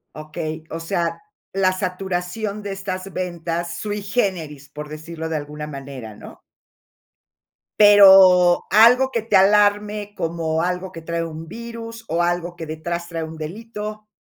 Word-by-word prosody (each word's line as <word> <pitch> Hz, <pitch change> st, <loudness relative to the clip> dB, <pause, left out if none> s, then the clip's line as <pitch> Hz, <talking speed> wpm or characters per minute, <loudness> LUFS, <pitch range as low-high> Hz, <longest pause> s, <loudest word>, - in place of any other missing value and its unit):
Okey, 155 Hz, +1 st, -6 dB
o 165 Hz, -, -5 dB
sea, 165 Hz, 0 st, -2 dB, 0.3 s
la 190 Hz, -1 st, +3 dB
saturación 190 Hz, +2 st, -3 dB
de 200 Hz, -1 st, -5 dB
estas 190 Hz, 0 st, -5 dB
ventas, 170 Hz, -1 st, -3 dB
sui 205 Hz, -1 st, -4 dB
generis, 180 Hz, -, -2 dB
por 150 Hz, 0 st, -8 dB
decirlo 160 Hz, +2 st, -7 dB
de 160 Hz, -1 st, -2 dB
alguna 150 Hz, +1 st, -6 dB
manera, 135 Hz, -6 st, -8 dB
¿no? -, -, -12 dB, 1.4 s
Pero, 190 Hz, -4 st, +8 dB
algo 240 Hz, +5 st, +6 dB
que 230 Hz, -3 st, -1 dB
te 220 Hz, -3 st, 0 dB
alarme, 205 Hz, +1 st, +3 dB
como 165 Hz, -2 st, -1 dB
algo 180 Hz, +1 st, -2 dB
que 165 Hz, -, -9 dB
trae 170 Hz, +1 st, -3 dB
un 160 Hz, 0 st, -7 dB
virus 230 Hz, +2 st, -8 dB
o 170 Hz, +1 st, 0 dB
algo 175 Hz, 0 st, -1 dB
que 165 Hz, -2 st, -7 dB
detrás 170 Hz, +2 st, -4 dB
trae 165 Hz, -2 st, -4 dB
un 160 Hz, 0 st, -8 dB
delito. 210 Hz, +5 st, -7 dB
175 Hz, 145 wpm, -21 LUFS, 160-205 Hz, 1.4 s, Pero